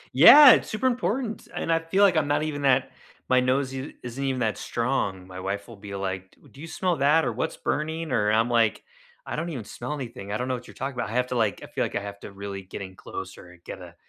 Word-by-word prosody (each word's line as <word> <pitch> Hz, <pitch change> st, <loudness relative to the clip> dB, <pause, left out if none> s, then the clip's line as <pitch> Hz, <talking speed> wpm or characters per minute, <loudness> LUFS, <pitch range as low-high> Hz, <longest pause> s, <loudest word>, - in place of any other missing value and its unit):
Yeah, 290 Hz, -3 st, +11 dB
it's -, -, 0 dB
super 220 Hz, +4 st, -3 dB
important, 245 Hz, -2 st, -1 dB
and 165 Hz, -, -2 dB
I 165 Hz, -, +3 dB
feel 190 Hz, +5 st, +1 dB
like 185 Hz, -4 st, +5 dB
I'm 150 Hz, -2 st, +2 dB
not 145 Hz, +1 st, +1 dB
even 145 Hz, -2 st, -3 dB
that 130 Hz, -1 st, +3 dB, 0.4 s
my 130 Hz, 0 st, +5 dB
nose 130 Hz, +1 st, 0 dB
i 135 Hz, +2 st, -5 dB
isn't 125 Hz, +3 st, -5 dB
even 130 Hz, -2 st, -1 dB
that 110 Hz, -2 st, 0 dB
strong. 115 Hz, -6 st, -2 dB
My 90 Hz, 0 st, -9 dB
wife 100 Hz, +3 st, -4 dB
will 115 Hz, -, -11 dB
be 100 Hz, -1 st, -8 dB
like, 95 Hz, -1 st, -4 dB
"D -, -, -20 dB
do 140 Hz, -, -14 dB
you 165 Hz, -, -7 dB
smell 180 Hz, 0 st, -1 dB
that 145 Hz, +4 st, +3 dB
or -, -, -1 dB
what's 160 Hz, -, -3 dB
burning?" 160 Hz, 0 st, -2 dB
Or 105 Hz, -2 st, +2 dB
I'm 115 Hz, +2 st, +3 dB
like, 115 Hz, -2 st, +2 dB, 0.4 s
"I -, -, -4 dB
don't 170 Hz, +1 st, -3 dB
even 130 Hz, -9 st, -5 dB
smell 125 Hz, +7 st, -6 dB
anything. 115 Hz, -8 st, -7 dB
I 105 Hz, -, -1 dB
don't 125 Hz, -, -3 dB
know 130 Hz, -, -1 dB
what 125 Hz, 0 st, -6 dB
you're -, -, -13 dB
talking 135 Hz, +1 st, -4 dB
about." 120 Hz, -3 st, -3 dB
I -, -, -6 dB
have 125 Hz, 0 st, +1 dB
to 125 Hz, -, -4 dB
like 110 Hz, -5 st, 0 dB
I -, -, -6 dB
feel -, -, -2 dB
like -, -, -4 dB
I -, -, 0 dB
have 100 Hz, 0 st, -8 dB
to 100 Hz, -, -10 dB
really 100 Hz, 0 st, -6 dB
get 95 Hz, +1 st, -8 dB
in 95 Hz, 0 st, -10 dB
closer 90 Hz, -, -9 dB
and 90 Hz, -1 st, -18 dB
get -, -, -8 dB
a 85 Hz, -1 st, -12 dB
125 Hz, 275 wpm, -25 LUFS, 100-150 Hz, 0.4 s, Yeah